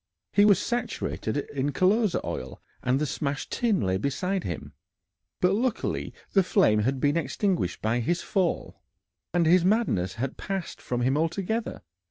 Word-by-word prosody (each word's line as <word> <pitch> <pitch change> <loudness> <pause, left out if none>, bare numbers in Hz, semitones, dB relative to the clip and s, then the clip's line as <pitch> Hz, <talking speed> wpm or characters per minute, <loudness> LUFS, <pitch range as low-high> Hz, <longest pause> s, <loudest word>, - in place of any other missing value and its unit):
He 205 - +6
was 205 -2 +6
saturated 235 - -2
in 140 0 -2
colza 205 +2 +3
oil, 65 - -5 0.2
and 125 +1 +2
the 150 - +1
smashed 140 0 -3
tin 225 -6 +1
lay 95 0 +1
beside 180 - -1
him, 85 -4 -5 0.7
but 180 +1 +4
luckily 235 +2 -1 0.2
the 195 - +5
flame 180 - +3
had 130 +5 0
been 145 +3 +2
extinguished 175 - -1
by 110 +3 +1
his 170 +9 0
fall. 185 -4 -1 0.5
And 175 -1 +2
his 175 +2 +5
madness 185 - +1
had 130 +3 -3
passed 195 -3 -4
from 125 -1 -2
him 135 +4 +2
altogether. 195 - -2
170 Hz, 155 wpm, -27 LUFS, 130-195 Hz, 0.7 s, He